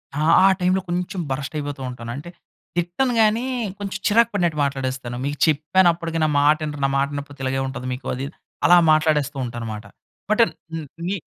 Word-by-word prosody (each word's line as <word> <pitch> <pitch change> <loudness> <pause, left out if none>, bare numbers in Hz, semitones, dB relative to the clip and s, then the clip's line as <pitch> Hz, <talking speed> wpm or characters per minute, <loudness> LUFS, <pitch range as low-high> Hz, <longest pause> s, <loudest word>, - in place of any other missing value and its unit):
ఆ! - - -2 0.3
ఆ - - +8
టైమ్‌లో 185 +1 +2
కొంచెం 180 +1 -2
బర్స్ట్ 140 +3 -3
అయిపోతుంటాను. 130 -5 -5
అంటే 150 +5 -8 0.5
తిట్టను 180 +10 0
గాని, 220 +3 +3 0.3
కొంచెం 195 -2 -4
చిరాకు 230 +2 +4
పడినట్టు 175 -6 0
మాట్లాడేస్తాను. 130 -3 -3
మీకు 145 +1 -2
చెప్పాను, 155 +4 +3
అప్పటికి 165 -1 -4
నా - - +4
మాట 150 +2 +5
ఇనరు, 145 -1 -5
నా - - +2
మాట 140 +1 +2
ఇనకపోతే 145 0 -7
ఇలాగే 135 0 0
ఉంటది 130 -1 -6
మీకు. 125 +1 -8
అది 130 - -5
ఇద్ 150 - -12 0.3
అలా 175 - +8
మాట్లాడేస్తుంటాను 145 -6 0
మాట. 105 +1 -8 0.5
But 215 - +4
and - - -2 0.5
me 200 +2 -1
150 Hz, 175 wpm, -22 LUFS, 135-180 Hz, 0.5 s, ఆ